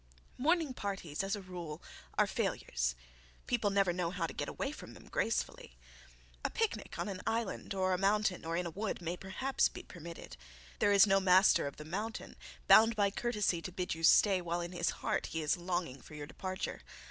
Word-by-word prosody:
Morning 320 0 +2
parties, 195 -8 -3
as 195 +1 0
a 200 - -8
rule, 175 -4 -7 0.4
are - - +5
failures. - - -1 0.5
People 230 -4 +1
never 195 -3 +2
know 175 -1 -1
how 180 -1 -2
to - - -5
get - - -3
away - - -3
from - - -10
them - - -14
gracefully. - - -2 0.7
A - - +1
picnic 450 -1 -2
on - - -2
an 190 -2 -5
island 225 -3 -2
or 185 -1 +2
a 180 - 0
mountain 200 -1 +2
or 165 +1 -2
in 180 - -1
a 170 - -4
wood 205 +5 -3
may 170 0 -3
perhaps 195 +9 0
be - - -9
permitted. 170 - -10 0.4
There 205 - +4
is 200 0 +8
no 195 -1 +4
master 185 -4 +5
of 140 - -7
the 150 - -8
mountain 210 +7 -4 0.3
bound 225 +1 +7
by 200 -2 +2
courtesy 210 -6 0
to 175 - -6
bid 180 0 -2
you 165 - -7
stay 190 +2 +6
while 175 0 -2
in 170 0 -5
his 175 -1 0 0.2
heart - - 0
he 160 -1 -3
is 150 - +2
longing 175 -6 -3
for 150 - -12
your 150 -1 -6
departure. 185 +4 -5
185 Hz, 200 wpm, -33 LUFS, 170-205 Hz, 0.7 s, is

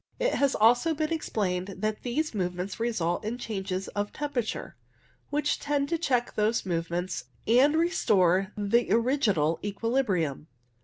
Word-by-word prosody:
It - - +1
has 280 -1 +2
also 245 +9 +4
been 310 +2 -1
explained 195 - -2
that 215 +2 -2
these 295 +5 -1
movements 180 0 -3
result 200 -8 -1
in 220 +3 -3
changes 195 -5 -4
of 205 0 -3
temperature, 285 -6 -3 0.5
which 295 0 0
tend 285 -1 -1
to 335 - 0
check 250 -7 0
those 215 +2 +1
move 170 -2 -2
ments 175 -5 -3 0.2
and 260 +7 +5
restore 195 - +2
the 210 +3 +1
original 215 - +2
equilibrium. 200 - -1
220 Hz, 140 wpm, -28 LUFS, 185-275 Hz, 0.5 s, and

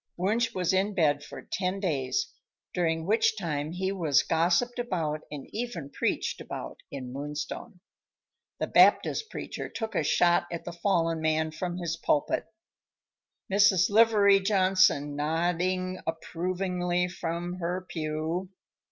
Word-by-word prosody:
Wunsch 225 +6 +1
was 180 -1 +1
in 195 +2 +1
bed 145 -5 +2
for - - -9
ten 185 +1 -2
days, 170 - -1 0.4
during 165 -2 0
which 220 +2 +2
time 155 -5 -2
he 190 +2 -2
was 165 -8 +2
gossiped 175 +10 +1
about 165 -10 -2
and 145 -2 -7
even 205 - -4
preached - - -1
about - - -7
in 130 -3 -7
Moonstone. 150 - -6 0.8
The - - 0
Baptist 445 - +4
preacher - - -6
took 225 -1 -5
a - - +1
shot 175 0 +3
at 170 - -5
the 175 - -5
fallen 170 -2 +1
man 155 0 +1
from 175 +2 -4
his 170 -2 -3
pulpit, 150 -3 0 1.1
Mrs. 200 -2 +5
Livery 205 -2 +6
Johnson 185 -7 +3
nodding 180 +4 0
approvingly 180 +2 -1
from 175 0 -4
her 180 +2 -2
pew. 160 +3 -3
175 Hz, 130 wpm, -28 LUFS, 160-190 Hz, 1.1 s, Livery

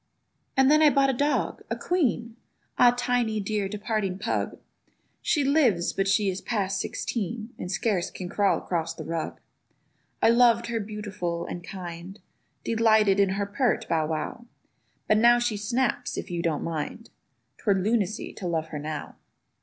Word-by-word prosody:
And 265 +1 +5
then 305 +1 +5
I 305 - +7
bought 275 -1 +3
a - - -3
dog—a 290 +4 -1
queen! 240 -10 0 0.4
Ah 245 - +8
Tiny, 245 -3 0
dear 205 -1 -1
departing 210 -2 -2
pug! - - -2 0.6
She 295 - +1
lives, 265 - +3
but 195 0 0
she 200 +1 +3
is 190 0 -2
past 200 -4 -1
sixteen 225 +1 -4
And 180 - -4
scarce 195 -2 0
can 185 - -7
crawl 200 +2 +2
across 165 -2 -2
the - - -7
rug. 165 -1 -4 0.8
I 225 - +5
loved 235 -1 +5
her 230 - 0
beautiful 205 -5 -4
and 175 - -6
kind; 180 +1 -8 0.4
Delighted 220 -3 +3
in 200 -1 +4
her 200 - 0
pert 240 +5 0
Bow 160 -2 +1
wow: 160 +10 -4 0.6
But 215 - +4
now 240 +1 +6
she 240 -2 0
snaps 240 +4 -1
if - - -5
you 170 -1 -1
don't 165 -4 -1
mind; 165 +8 -4 0.5
'Twere 200 -3 +2
lunacy 210 +1 0
to 185 - -5
love 160 -2 -1
her 150 - -5
now. 150 0 -6
210 Hz, 160 wpm, -26 LUFS, 180-235 Hz, 0.8 s, Ah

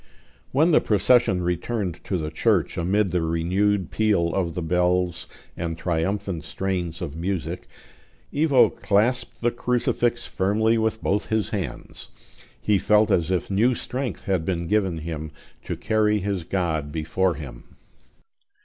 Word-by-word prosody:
When 155 +6 +3
the - - +5
procession 105 -2 +3
returned 90 +1 -2
to 95 - -1
the 75 -2 -4
church 80 - +1
amid 95 +2 +1
the 90 - +1
renewed 90 +4 0
peal 100 -7 +1
of 85 -4 -1
the 90 - -2
bells 90 +1 +1 0.3
and 85 -1 -3
triumphant 90 +1 -2
strains 90 0 -3
of 75 -4 -5
music, 85 0 -3 0.7
Ivo 145 -3 +4
clasped 115 +5 0
the 120 0 +2
crucifix 120 0 0
firmly 110 +4 +1
with 110 0 -1
both 105 +1 0
his 110 -1 0
hands; 100 -6 -5 0.5
he 105 -2 +2
felt 105 +3 +3
as 85 -1 +2
if 95 +1 -1
new 115 +6 +3
strength 125 +1 -4
had 95 -4 0
been 85 -1 -2
given 95 -3 +1
him 80 -1 -5 0.4
to - - -3
carry 105 -1 +2
his 100 -3 -2
God 80 -6 -1
before 85 +3 0
him. 70 -6 -10
95 Hz, 140 wpm, -24 LUFS, 85-105 Hz, 0.7 s, the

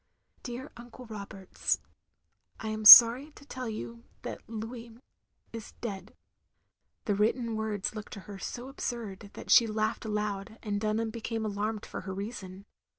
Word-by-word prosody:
^'Dear 250 +3 -7
Uncle 245 +1 -12
Roberts, 200 -3 -3 0.8
I 220 - -5
ant 215 0 +1
sorry 245 +7 +11
to 280 - -16
tell 255 -4 -6
you 230 +2 -8 0.2
that - - -6
Louis 230 +1 -8 0.6
is 225 -2 -9
dead 200 -5 -7 0.3
— - - -49
" - - -51
the 205 - +1
written 225 +3 0
words 215 -2 -3
looked 215 -1 -9
to 200 - -8
her 200 0 -10
so 245 +5 -6
absurd 225 -7 -6
that - - -7
she 230 - +7
laughed 215 +1 -2
aloud, 210 -1 -4
and 205 -2 -3
Dunham 220 +1 -1
became 225 -1 -4
alarmed 210 +1 -3
for - - -7
her 190 0 -7
reason. 195 -2 -8
220 Hz, 155 wpm, -29 LUFS, 205-235 Hz, 0.8 s, sorry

